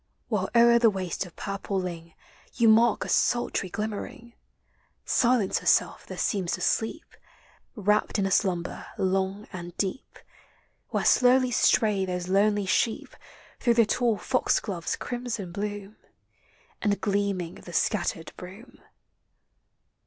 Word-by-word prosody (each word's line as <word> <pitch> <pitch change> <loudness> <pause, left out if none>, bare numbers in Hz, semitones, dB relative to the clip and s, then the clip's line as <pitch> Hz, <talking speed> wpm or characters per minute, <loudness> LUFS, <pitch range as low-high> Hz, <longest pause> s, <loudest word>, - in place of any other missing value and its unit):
While - - -1
o'er 235 0 +6
the 230 -1 +5
waste 190 -2 -3
of 170 - -17
purple 195 -1 -3
ling 170 -3 -6 0.4
You 235 -2 +3
mark 225 +1 +4
a - - -6
sultry 240 -5 +1
glimmering; 220 +3 -6 0.7
Silence 235 -5 +2
herself - - +1
there - - -8
seems 190 -4 -1
to - - -3
sleep, 225 +9 -2 0.6
Wrapped 210 0 +1
in 200 - +1
a 195 - -1
slumber 180 -3 -1
long 190 +2 -1
and 175 -1 -8
deep, 195 +6 -4 0.7
Where - - -1
slowly 255 0 +4
stray 210 -3 +3
those 180 -1 -3
lonely 205 +1 +2
sheep 220 +4 -1 0.4
Through 235 -2 +2
the 230 -1 +5
tall 230 0 +1
foxglove's 200 -8 -1
crimson 240 -7 -5
bloom, 205 +1 -5 0.8
And 205 -2 +1
gleaming 200 -4 -2
of - - -17
the 175 - -9
scattered 175 -5 -1
broom. 195 +7 -12
205 Hz, 130 wpm, -26 LUFS, 185-230 Hz, 0.8 s, o'er